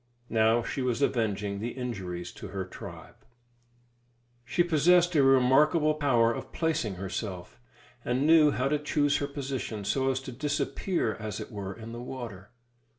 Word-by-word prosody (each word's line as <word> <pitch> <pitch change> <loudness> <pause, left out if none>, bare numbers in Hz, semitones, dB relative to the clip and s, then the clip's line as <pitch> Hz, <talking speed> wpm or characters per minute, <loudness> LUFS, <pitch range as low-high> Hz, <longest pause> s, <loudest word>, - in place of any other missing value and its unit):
Now 115 +1 +3
she 135 - -3
was 125 +2 0
avenging 105 -5 0
the 115 +3 -4
injuries 95 -9 -5
to - - -9
her 95 -1 -4
tribe. 90 - -10 1.3
She 125 +8 +1
possessed 175 +2 +4
a 145 - +6
remarkable 135 +4 +4
power 120 -6 +3
of - - -7
placing 160 - -1
herself, 95 - -5 0.4
and 125 +3 0
knew 160 -1 +6
how 130 -2 0
to 150 +1 +1
choose 145 -1 +1
her 140 - -2
position 130 -7 -4
so 135 +5 +1
as 130 0 0
to 135 - -7
disappear, 145 - -1
as 110 -2 -5
it - - -7
were, 100 -3 -5
in 115 0 -9
the 120 +1 -7
water. 120 -7 -7
125 Hz, 155 wpm, -28 LUFS, 110-145 Hz, 1.3 s, a